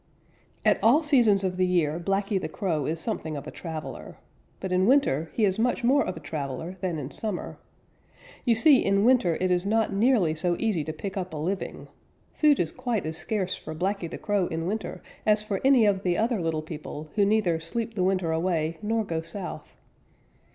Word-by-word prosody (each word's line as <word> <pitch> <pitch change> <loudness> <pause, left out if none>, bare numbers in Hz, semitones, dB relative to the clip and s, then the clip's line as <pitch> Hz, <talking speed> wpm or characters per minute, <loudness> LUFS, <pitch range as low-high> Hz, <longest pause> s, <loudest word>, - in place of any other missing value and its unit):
_ - - -40 0.6
At - - +4
all 275 +9 +5
seasons 235 -10 +4
of 185 -1 -1
the 185 - +3
year 170 -3 +1
Blacky 195 +2 0
the - - -4
Crow 165 -8 -2
is 160 +1 -2
something 160 -7 -3
of 140 - -7
a 155 - -7
traveler. 160 -3 -7 0.4
But 190 - -4
in 185 +2 +3
winter 230 - +3
he 220 - +3
is 195 +1 0
much 245 +1 +1
more 275 +4 +4
of - - -4
a - - -6
traveler 155 +4 -5
than 180 -4 -1
in 145 -1 -6
summer. 215 -5 -3 0.8
You 235 -3 +3
see, 265 +4 +5
in 200 +1 +2
winter 245 -9 +4
it 185 0 +1
is 180 0 +2
not 220 +1 +1
nearly 205 -6 +3
so 175 +2 0
easy 210 -9 0
to 155 - -3
pick 190 +5 -6
up 185 -3 -4
a - - -4
living. 185 +6 -4 0.5
Food 300 -2 +4
is 165 - 0
quite 235 -7 -2
as 160 +1 -3
scarce 190 -2 -2
for 155 - -8
Blacky 185 0 -2
the - - -6
Crow 205 -4 0
in 165 -1 -3
winter 215 +4 -4 0.2
as 210 0 +3
for 200 -2 -3
any 265 -4 +5
of 200 -2 +2
the 180 -2 0
other 225 -2 +1
little 160 -2 -1
people 155 -1 -8
who 205 - +3
neither 200 -5 +2
sleep 225 +8 -4
the 190 -4 -1
winter 185 -3 +1
away 160 -1 -1
nor 220 +1 0
go 165 -5 -3
south. 175 +3 -7
190 Hz, 205 wpm, -26 LUFS, 165-220 Hz, 0.8 s, all